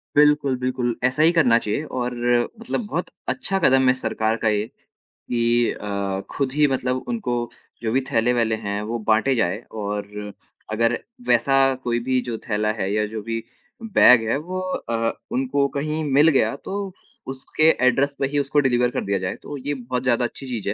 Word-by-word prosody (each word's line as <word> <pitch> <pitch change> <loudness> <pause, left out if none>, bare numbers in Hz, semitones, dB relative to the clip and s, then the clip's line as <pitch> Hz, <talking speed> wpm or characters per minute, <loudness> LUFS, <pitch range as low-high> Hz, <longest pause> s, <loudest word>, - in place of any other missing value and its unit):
बिल्कुल, 150 -2 +4
बिल्कुल। 125 -1 -1
ऐसा 130 +4 +2
ही 165 - +6
करना 150 -9 +4
चाहिए 105 +6 -2 0.2
और 125 0 -2 0.5
मतलब 230 -1 -3
बहुत 175 -2 -3 0.2
अच्छा 195 0 -1
कदम 135 -5 +4
है - - +5
सरकार 110 -3 -1
का 110 - -1
ये 105 0 0 0.4
कि 120 0 0
अ, 100 -1 -3
खुद 135 -2 -1
ही 150 0 +4
मतलब 130 -1 -1
उनको 225 - -2 0.5
जो 110 -2 -1
भी 130 +3 +2
थैले-वैले 115 -2 +2
हैं 100 +1 -2
वो 115 +3 -3
बाँटे 115 +5 +3
जाएँ 100 -3 0
और 105 -1 -5 0.4
अगर 115 +2 +1 0.3
वैसा 135 -1 +3 0.3
कोई 120 -1 0
भी 130 -1 +2
जो 120 -2 -4
थैला 105 +1 +1
है 100 -3 -2
या 105 0 +1
जो 110 0 -6
भी 115 0 -3 0.4
बैग 125 - +6
है 125 - +2
वो 180 +5 -5
अ, 115 -11 -2 0.2
उनको 135 +2 +1
कहीं 155 +2 -2
मिल 145 +4 +6
गया 140 -2 +2
तो 195 +5 -5 0.4
उसके 135 +3 -3 0.2
एड्रैस 140 +3 +2
पे 135 - +1
ही 145 +1 -1
उसको 140 +1 +1
डिलिवर 125 -3 +2
कर - - -2
दिया 100 0 0
जाए, 90 0 -3
तो 145 - -8
ये 140 +2 -3
बहुत 125 -1 -4
ज़्यादा 125 -1 +2
अच्छी 130 +3 -6
चीज़ 115 -5 -3
है - - 0
125 Hz, 185 wpm, -22 LUFS, 110-140 Hz, 0.5 s, ही